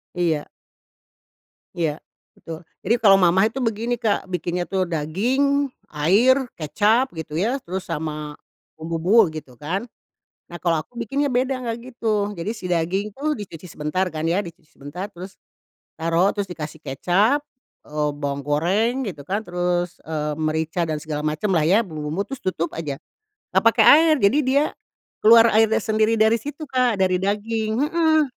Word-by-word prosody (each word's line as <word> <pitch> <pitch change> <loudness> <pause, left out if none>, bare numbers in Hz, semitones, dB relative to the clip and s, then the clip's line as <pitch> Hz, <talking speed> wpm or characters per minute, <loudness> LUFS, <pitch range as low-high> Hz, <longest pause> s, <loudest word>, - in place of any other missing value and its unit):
Iya. 165 -4 0 1.3
Iya, 160 -4 -1 0.4
betul. 165 +1 -9 0.2
Jadi, 230 +5 +3
kalau 195 -3 +7
mamah 190 +4 +4
itu 265 - -5
begini 230 0 -1
Kak 210 -4 -1
bikinnya 180 0 -2
tuh 185 -2 0
daging, 250 - +1 0.2
air, 230 - +3
kecap, 215 - +1
gitu 155 -1 -6
ya, 235 +10 0
terus 190 -3 -5
sama 150 -1 -4 0.4
bumbu-bumbu, 165 +4 +2
gitu 130 -6 -9
kan. 180 +8 -2 0.7
Nah, 175 - -7
kalau 165 -3 +1
aku 240 - -18
bikinnya 275 +5 -1
beda 255 +1 0
enggak 230 -1 -3 0.2
gitu. 215 -3 0
Jadi 190 +4 -4
si 185 - -9
daging 185 +5 -1
tuh 300 +2 -2
dicuci 180 -4 -9
sebentar, 150 +6 -1
kan 155 0 -4
ya, 175 +5 +1
dicuci 170 -3 -12
sebentar, 145 +8 -7
terus 185 +2 -10 0.6
taruh, 170 +4 +2
terus 200 -2 -2
dikasih 155 -2 -7
kecap, 195 - +2 0.5
eee, 150 0 -1
bawang 140 -1 -3
goreng, 180 - +1
gitu 145 -7 -7
kan, 205 +3 -1
terus, 175 0 -1
eee, 150 -1 -3
merica 160 +2 -1
dan 155 -1 -2
segala 150 -1 -4
macamlah 155 +2 0
ya 200 +5 +5
bumbu-bumbu, 155 +4 -3
terus 270 -2 -8
tutup 170 -3 -2
aja. 150 -3 -4 0.6
Enggak - - +4
pakai - - +3
air. 315 +1 +7
Jadi 230 +8 +3
dia 275 +3 +3 0.6
keluar 230 +1 +8
airnya 220 0 +4
sendiri 220 +1 +1
dari 220 +1 +4
situ 290 +6 -5
Kak, 250 -5 +1
dari 185 -1 +2
daging, 215 +2 -1
heeh, 315 +1 +3
185 Hz, 155 wpm, -22 LUFS, 160-230 Hz, 1.3 s, keluar